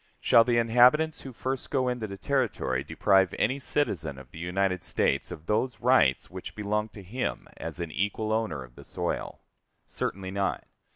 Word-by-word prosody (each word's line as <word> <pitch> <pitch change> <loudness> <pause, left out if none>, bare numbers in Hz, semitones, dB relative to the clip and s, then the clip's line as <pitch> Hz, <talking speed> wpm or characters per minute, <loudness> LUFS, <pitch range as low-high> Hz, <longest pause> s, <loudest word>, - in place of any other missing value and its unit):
Shall 115 - +6
the 120 0 +1
inhabitants 125 +7 +4
who 135 - -8
first 130 +2 -3
go 130 -2 +1
into 125 -3 -2
the 100 -1 -7
Territory 105 - 0
deprive 95 +1 +3
any 130 +5 +1
citizen 85 - -1
of 65 -1 -13
the 80 - -10
United 95 +1 0
States - - 0
of 75 - -8
those 115 +3 0
rights 120 - +3
which - - -8
belong 105 +1 -1
to 100 - -10
him 125 +8 -3
as 80 0 -6
an 85 -2 -4
equal 105 +5 -1
owner 90 -12 -1
of - - -15
the - - -13
soil? - - -4 0.4
Certainly 95 -1 -4
not. 100 0 -1
105 Hz, 175 wpm, -28 LUFS, 90-125 Hz, 0.4 s, Shall